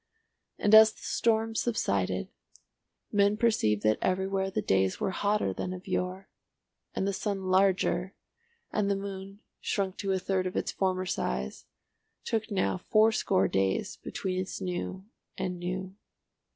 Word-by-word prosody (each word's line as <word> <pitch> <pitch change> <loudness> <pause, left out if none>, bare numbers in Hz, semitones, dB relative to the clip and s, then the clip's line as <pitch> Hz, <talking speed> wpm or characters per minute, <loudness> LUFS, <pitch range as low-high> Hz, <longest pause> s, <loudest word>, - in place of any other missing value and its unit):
And 205 - +1
as 220 0 +10
the - - -17
storms 225 -1 +1
subsided 95 - 0 0.8
men 205 0 +3
perceived 215 - +2
that 110 0 +3
everywhere 190 +1 0
the 195 - -2
days 95 -1 +1
were 190 - 0
hotter 205 - 0
than 185 - -4
of 185 +1 -9
yore, 185 +1 -2 0.7
and 195 - 0
the 200 - 0
sun 195 -1 -2
larger, 190 -1 +2 0.6
and 205 -1 0
the 200 - +2
moon, 195 +1 -7 0.2
shrunk 195 -2 -2
to 195 - -2
a 190 - +2
third 185 0 0
of 185 - -6
its - - -1
former 185 -1 0
size, 65 - -3 0.6
took 220 0 -1
now 190 -2 0
fourscore 215 - +3
days 95 0 0
between 185 -1 -3
its 185 - -4
new 185 +1 -4 0.3
and 180 -1 -3
new. 185 +1 -4
190 Hz, 145 wpm, -29 LUFS, 180-200 Hz, 0.8 s, as